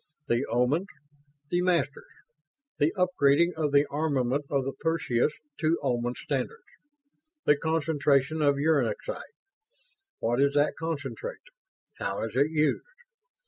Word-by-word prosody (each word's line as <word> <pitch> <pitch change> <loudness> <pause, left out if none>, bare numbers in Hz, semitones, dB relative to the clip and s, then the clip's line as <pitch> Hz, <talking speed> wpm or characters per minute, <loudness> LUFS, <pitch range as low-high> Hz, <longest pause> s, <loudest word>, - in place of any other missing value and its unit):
"The 120 +2 +1
Omans. 125 +10 +1 0.6
The 175 0 +2
Masters. 170 -6 0 0.7
The 150 +3 +3
upgrading 170 -2 +3
of 155 -2 0
the 140 +1 +5
armament 140 -2 0
of 135 -2 0
the 135 - -1
Perseus 155 -5 +1 0.3
to 160 +1 +2
Oman 120 -2 0
standards. 455 - -3 0.8
The 150 - +6
concentration 155 -1 +1
of 145 -1 +4
uranexite. 150 - 0 1.0
What 120 +3 0
is 140 0 +3
that 145 0 +3
concentrate? 160 - -4 0.6
How - - -2
is - - -5
it 145 - +3
used? 155 -1 +1
145 Hz, 120 wpm, -28 LUFS, 140-160 Hz, 1.0 s, The